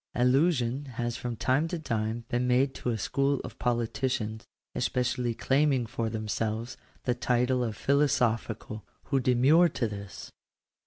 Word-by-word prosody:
§2. - - 0
Allusion 135 -1 +2
has 120 -2 -2
from 120 -1 -4
time 130 +7 +1
to 175 - -3
time 115 -5 -2
been 125 +1 0
made 130 +2 +3
to - - -4
a 115 - 0
school 140 +5 0
of - - -9
politicians, 120 -2 -1 0.3
especially 125 -1 -1
claiming 135 -1 +2
for 115 -1 -3
themselves 110 +1 -3 0.3
the 125 - +1
title 125 +1 +1
of 110 -3 -3
philo 140 +4 +3
sophical, 110 -3 -1 0.2
who 135 - 0
demur 130 +7 +5
to 120 -6 -1
this. 100 -2 -8
125 Hz, 150 wpm, -28 LUFS, 115-135 Hz, 0.3 s, demur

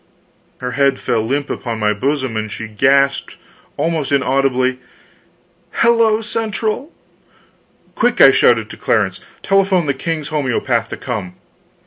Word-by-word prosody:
Her 125 0 -5
head 140 +1 +2
fell 110 - -1
limp 140 +6 -2
upon 115 -2 -4
my 105 -1 +1
bosom, 130 +1 -2
and 110 -1 -3
she 115 - -6
gasped, 135 +5 +1 0.4
almost 160 -4 -1
inaudibly: 130 -1 +1 0.9
"HELLO 230 -2 +3
CENTRAL!" 220 - -3 1.0
"Quick!" - - 0
I - - +9
shouted - - +3
to - - -10
Clarence; - - 0 0.2
"telephone 195 -3 +2
the 140 - 0
king's 155 +2 -4
homeopath 130 -5 -1
to - - -6
come!" 100 -8 -5
135 Hz, 125 wpm, -17 LUFS, 125-165 Hz, 1.0 s, I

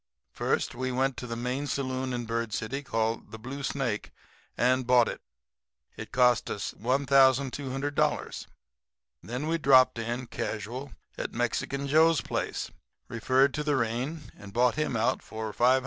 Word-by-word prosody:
"First - - 0
we 130 0 -2
went 130 +1 +1
to 125 - -5
the 115 - -4
main 125 +4 -2
saloon 130 -2 -2
in 120 -1 -3
Bird 115 -1 -2
City, 125 +5 -3
called 115 -4 -2
the 110 - -8
Blue 130 +5 -7
Snake, 130 -6 -2 0.5
and 130 0 +2
bought 125 -2 +5
it. - - -5 0.7
It 110 - -8
cost 125 -1 +3
us 100 - -3
$1,200. 135 +2 +1 0.7
And - - -14
then 125 +6 -3
we 165 +1 0
dropped 130 -4 +5
in, 120 +2 -3
casual, 120 +4 -5 0.3
at - - -3
Mexican 135 +4 -1
Joe's 160 +2 +5
place, - - -3 0.4
referred 130 +4 +2
to 150 - -2
the 150 -1 +1
rain, 125 +6 -2
and 100 -1 -11
bought 125 +1 +3
him 150 -5 -1
out 110 - +1
for 110 -1 -6
$500. 130 +2 +4
130 Hz, 155 wpm, -28 LUFS, 115-140 Hz, 0.7 s, bought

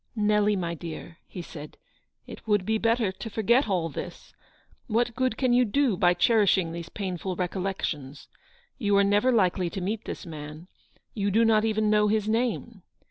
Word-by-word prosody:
" - - -44 0.2
Nelly, 210 0 +3
my 170 -3 -2
dear/' 165 +1 -8
he 180 - -8
said, 155 -3 -10 0.2
" - - -48
it - - -11
would 205 -3 +2
be 220 +1 0
better 225 -3 +1
to 225 +4 -8
forget 225 +4 +2
all 175 -4 0
this. 155 - -8 0.5
What 235 +1 0
good 255 -3 0
can 255 -2 +2
you 250 +1 +5
do 250 0 +1
by 175 0 +3
cherishing 195 -7 +3
these 170 0 -7
painful 185 -2 -4
recollections? 175 -7 -4 0.5
You 205 -4 +2
are 200 - +5
never 205 +5 +3
likely 185 -5 +2
to 195 - -5
meet 205 +4 -3
this - - -6
man; 155 +1 -9 0.5
you 200 -2 -1
do 225 +4 +3
not 220 -1 +3
even 215 -1 +1
know 210 0 +4
his 215 0 0
name. 230 -2 -1
205 Hz, 185 wpm, -26 LUFS, 180-225 Hz, 0.5 s, you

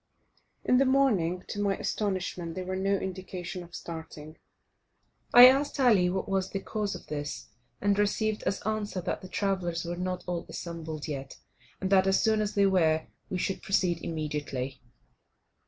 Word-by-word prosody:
In 250 - +4
the 270 - +4
morning, 210 -11 +2
to 205 - -3
my 200 -1 +1
astonishment, 185 -4 -2
there 185 - -4
were 185 +1 -3
no 195 +1 +1
indications 185 -1 -5
of 175 0 -12
starting. 160 -1 -8 0.9
I 245 +1 +11
asked 275 +3 +4
Ali 215 -9 +5
what 190 +1 -2
was 190 -1 0
the 195 - -3
cause 210 0 -3
of - - -10
this, 145 -1 -5 0.3
and 205 0 +2
received 215 +1 +1
as - - -1
answer 215 -2 -2
that 180 - -3
the 185 - -10
travellers 180 -5 -1
were 170 +1 -3
not 180 0 -3
all 175 -1 -3
assembled 160 -3 -6
yet, 135 -3 -6 0.4
and 190 0 -2
that, 190 -1 +5
as 195 - +4
soon 220 -1 +2
as 210 -1 -2
they 200 -1 +4
were, 160 -5 +3 0.2
we 185 - -2
should 190 +1 -2
proceed 180 -3 +1
immediately. 150 -4 -4
185 Hz, 170 wpm, -29 LUFS, 170-200 Hz, 0.9 s, I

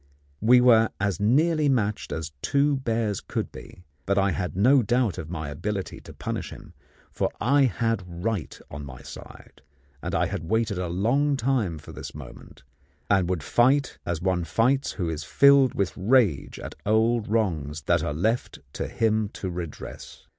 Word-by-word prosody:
We 125 +3 +6
were 115 -3 +5
as 100 -3 -1
nearly 150 +8 +3
matched 105 -5 0
as 80 0 -4
two 140 0 +2
bears 115 -5 -1
could - - -4
be; 90 - -12 0.2
but 100 +1 +1
I 100 -1 +3
had 90 -1 -3
no 130 +7 +5
doubt 120 -1 0
of 80 - -7
my 80 -4 -4
ability 95 +6 -4
to - - -12
punish - - -4
him, - - -12 0.4
for - - -1
I 140 +3 +4
had 115 -4 0
right 90 +2 -4
on 75 0 -7
my 65 -3 -10
side, - - -12 0.4
and - - -4
had 80 - -1
waited 110 -3 0
a 90 - -2
long 125 +11 +1
time 115 -9 0
for 75 - -11
this - - -8
moment, - - -12 0.5
and 95 -3 +3
would 90 -5 -1
fight 130 - +2
as 85 -2 -2
one 90 -1 0
fights 130 +10 +1
who 90 -5 -3
is 80 -1 -3
filled 140 - +5
with 100 -2 -1
rage 95 - +2
at - - -7
old 110 +1 +2
wrongs 80 -9 -1
that - - +2
are - - -2
left 110 +11 -1 0.2
to - - -3
him 110 -2 0
to 95 - -5
redress. 85 -3 -8
105 Hz, 170 wpm, -25 LUFS, 85-125 Hz, 0.5 s, We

